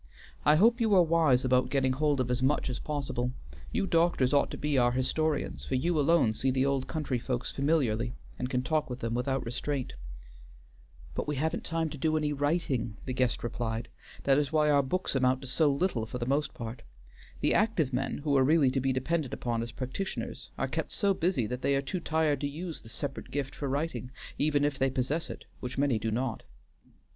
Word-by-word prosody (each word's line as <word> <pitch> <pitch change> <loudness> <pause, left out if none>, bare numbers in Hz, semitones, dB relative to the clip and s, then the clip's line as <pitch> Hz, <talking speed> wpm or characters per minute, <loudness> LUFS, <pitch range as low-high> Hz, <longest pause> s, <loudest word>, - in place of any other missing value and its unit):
I 150 - +6
hope 230 +8 +4
you 220 -3 +4
are 180 - +7
wise 155 -6 +3
about 125 0 +3
getting 130 -1 +2
hold 145 0 +1
of 125 -1 0
as 125 0 0
much 135 0 +1
as 125 - -4
possible. 135 -4 -2 0.4
You - - 0
doctors 165 -7 +2
ought 140 - +3
to - - -6
be 150 -1 -1
our 120 -2 +4
historians, 130 - 0
for 70 - -2
you 160 +5 +1
alone 145 -6 +4
see 130 +4 0
the 130 +1 +2
old 140 -2 0
country 150 -6 -2
folks 125 +1 -2
familiarly 125 -6 +1 0.2
and 125 - -2
can 125 -1 0
talk 155 0 0
with 125 +1 -6
them 115 0 -2
without 130 +2 -1
restraint." 130 +3 -3 1.2
"But - - -3
we 150 - -1
haven't 155 +4 -1
time 165 0 -1
to 145 - -7
do 155 +2 +2
any 150 -1 0
writing," 140 -7 -1
the 130 - -3
guest 125 -2 0
replied. 115 -1 -3 0.3
"That 135 0 +4
is 145 -1 -1
why 150 -1 +3
our 145 -1 +5
books 180 +8 -1
amount 130 -1 +2
to 135 - -7
so 145 +3 +3
little 140 -7 0
for 125 - -5
the 120 - -3
most 140 +2 0
part. 115 0 -6 0.6
The - - +3
active 195 - +2
men, 135 +2 -1
who 145 -2 +2
are 135 - +5
really 145 -1 +4
to 135 - 0
be 135 +1 +1
depended 135 +2 -1
upon 115 -2 -2
as 115 0 -5
practitioners, 130 +12 -5
are - - 0
kept - - -3
so 200 -1 +2
busy 165 - +1
that 125 +3 -4
they 140 - +2
are 135 - +2
too 185 +6 -3
tired 160 -4 +1
to 145 - 0
use 160 +3 -6
the 110 - -13
separate 140 +4 -5
gift 140 -1 -3
for 140 - -4
writing, 145 -1 -2 0.3
even 145 -1 +3
if 145 -2 -1
they 135 0 +3
possess 135 +5 -1
it, - - -8
which 125 +1 -6
many 135 -5 +2
do 115 - -1
not. 120 +1 -2
135 Hz, 215 wpm, -30 LUFS, 125-155 Hz, 1.2 s, are